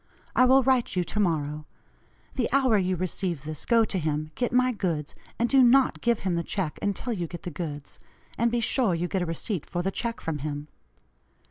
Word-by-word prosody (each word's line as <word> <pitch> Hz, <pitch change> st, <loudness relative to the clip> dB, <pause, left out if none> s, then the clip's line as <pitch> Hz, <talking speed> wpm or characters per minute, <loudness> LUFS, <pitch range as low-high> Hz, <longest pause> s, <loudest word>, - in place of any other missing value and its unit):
I 255 Hz, -, +6 dB
will 265 Hz, +1 st, +5 dB
write 255 Hz, -4 st, +2 dB
you 180 Hz, -, +2 dB
to 210 Hz, -, -4 dB
morrow. 150 Hz, -5 st, -1 dB, 0.7 s
The 250 Hz, -3 st, -1 dB
hour 260 Hz, -3 st, +3 dB
you 185 Hz, 0 st, 0 dB
receive 175 Hz, -3 st, -2 dB
this 155 Hz, 0 st, -6 dB
go 230 Hz, -2 st, +5 dB
to 195 Hz, -, -1 dB
him, 155 Hz, -1 st, -2 dB
get 245 Hz, -, -1 dB
my 255 Hz, +1 st, +3 dB
goods, 170 Hz, -9 st, -2 dB, 0.2 s
and 235 Hz, -, +2 dB
do 270 Hz, +1 st, +5 dB
not 255 Hz, +2 st, +4 dB
give 235 Hz, -2 st, +1 dB
him 185 Hz, -2 st, -1 dB
the 170 Hz, -, -1 dB
check 175 Hz, -3 st, -3 dB
until 205 Hz, +4 st, -2 dB
you 175 Hz, -5 st, -3 dB
get 175 Hz, +1 st, -9 dB
the 175 Hz, -, -5 dB
goods, 145 Hz, -3 st, -6 dB, 0.4 s
and 235 Hz, +1 st, +2 dB
be 235 Hz, 0 st, 0 dB
sure 230 Hz, -5 st, +2 dB
you 170 Hz, +2 st, -1 dB
get 190 Hz, 0 st, -1 dB
a 175 Hz, -, -1 dB
receipt 165 Hz, +1 st, -3 dB
for 175 Hz, 0 st, -2 dB
the 195 Hz, -, 0 dB
check 230 Hz, +3 st, -3 dB
from 160 Hz, -2 st, -3 dB
him. 145 Hz, +1 st, -5 dB
185 Hz, 215 wpm, -26 LUFS, 160-235 Hz, 0.7 s, I